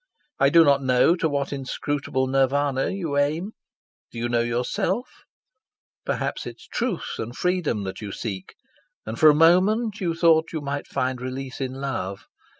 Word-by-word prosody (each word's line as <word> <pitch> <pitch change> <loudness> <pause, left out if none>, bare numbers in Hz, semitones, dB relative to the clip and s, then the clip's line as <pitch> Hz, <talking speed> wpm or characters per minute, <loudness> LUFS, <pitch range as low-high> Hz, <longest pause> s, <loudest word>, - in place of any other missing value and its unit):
I 135 - +5
do 165 +3 +7
not 140 -2 +4
know 130 +5 +4
to 160 - 0
what 140 -1 -2
inscrutable 135 0 -2
Nirvana 135 +1 +1
you 165 -7 -3
aim. 155 +8 0 0.6
Do - - -11
you 120 +1 -2
know 120 -1 +2
yourself? 125 - -2 0.8
Perhaps - - -2
it - - -7
is - - -17
Truth 235 -7 -3
and 115 +2 -5
Freedom 180 - 0
that 95 +2 -6
you 105 -2 -5
seek, 95 -3 -6 0.5
and 110 +1 -6
for 155 - +8
a 150 - +5
moment 200 +7 +3
you 170 -3 0
thought 165 -1 +4
that - - -14
you 160 - -3
might 140 0 -4
find 130 -2 -2
release 130 +1 -5
in 130 -1 -3
Love. 130 -8 -4
140 Hz, 170 wpm, -24 LUFS, 130-165 Hz, 0.8 s, for